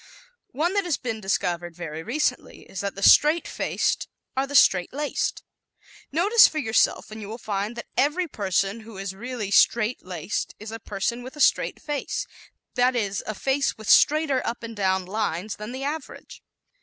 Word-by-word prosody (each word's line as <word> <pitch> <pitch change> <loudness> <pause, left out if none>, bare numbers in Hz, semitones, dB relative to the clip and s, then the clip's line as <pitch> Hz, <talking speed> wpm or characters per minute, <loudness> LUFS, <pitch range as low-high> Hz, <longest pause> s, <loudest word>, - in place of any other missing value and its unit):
One 330 +7 -1
that 400 -1 +2
has 340 -5 0
been 225 -3 -4
discovered 175 -3 -1
very 160 -2 -6
recently 260 - -2
is 190 - -9
that 200 0 -3
the 200 - -6
straight 305 +9 +6
faced - - -1 0.3
are 265 +1 0
the 285 - -6
straight 185 -8 +5
laced. 290 +2 -2 0.7
Notice 400 +10 +6
for 315 - -6
yourself 225 -5 +1
and 215 0 -8
you 205 - -7
will 225 - -6
find 210 0 -3
that 235 - -6
every 315 +6 +1
person 195 - -1
who 220 -2 -12
is 195 0 -4
really 225 -1 -5
"straight 230 +3 +3
laced" 180 0 -4
is 215 +1 -8
a 225 - -6
person 210 +4 -3
with 255 +4 -9
a - - -11
straight - - +3
face 295 -3 -3 0.5
that 250 +1 +2
is, 200 -4 -1
a 215 - -3
face 275 +5 0
with 215 -2 -10
straighter 295 -3 +4
up 235 0 -4
and 230 0 -7
down 190 -2 +1
lines 200 -1 -2
than 210 +2 -7
the 260 +2 -5
average. 305 +3 -6
225 Hz, 180 wpm, -25 LUFS, 195-275 Hz, 0.7 s, straight